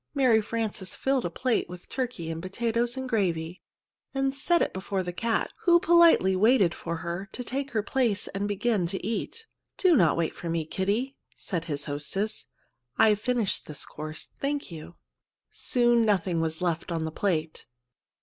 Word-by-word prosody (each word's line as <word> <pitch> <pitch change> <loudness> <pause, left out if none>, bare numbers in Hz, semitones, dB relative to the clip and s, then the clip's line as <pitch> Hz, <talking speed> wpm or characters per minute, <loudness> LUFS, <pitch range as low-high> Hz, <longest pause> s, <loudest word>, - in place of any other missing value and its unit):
Mary 250 -5 +4
Frances 210 -3 -3
filled 265 -2 0
a - - 0
plate 240 +6 0
with 180 0 -10
turkey 240 -11 -3
and 165 0 -5
potatoes 235 +6 -1
and 260 0 -3
gravy, 180 -7 -1 0.5
and 270 0 +1
set 340 +5 +2
it - - 0
before 190 0 -2
the 180 0 -4
cat, 230 +5 0
who 345 -1 +7
politely 335 - +5
waited 205 -3 +4
for 170 0 -4
her 175 +3 -4
to 250 - -5
take 275 +3 -3
her 220 -6 -1
place 230 -3 0
and 200 +1 -2
begin 205 -2 0
to 190 +2 -4
eat. 230 - -3 0.3
"Do 365 -3 +5
not 170 - +4
wait 165 -1 0
for 170 - -6
me, 165 -1 -1
Kitty," 205 - -1 0.2
said 170 -3 -4
his 145 -3 -3
hostess; 150 +9 -2 0.5
"I've 215 -1 +4
finished 240 -5 0
this 150 - -4
course, 155 +1 -6
thank 280 -5 -2
you." 165 +1 -9 0.6
Soon 240 -1 +2
nothing 185 -5 +1
was 160 +2 -2
left 170 0 -1
on 165 -1 -1
the 160 - -3
plate. 160 -3 -2
205 Hz, 170 wpm, -27 LUFS, 170-245 Hz, 0.6 s, who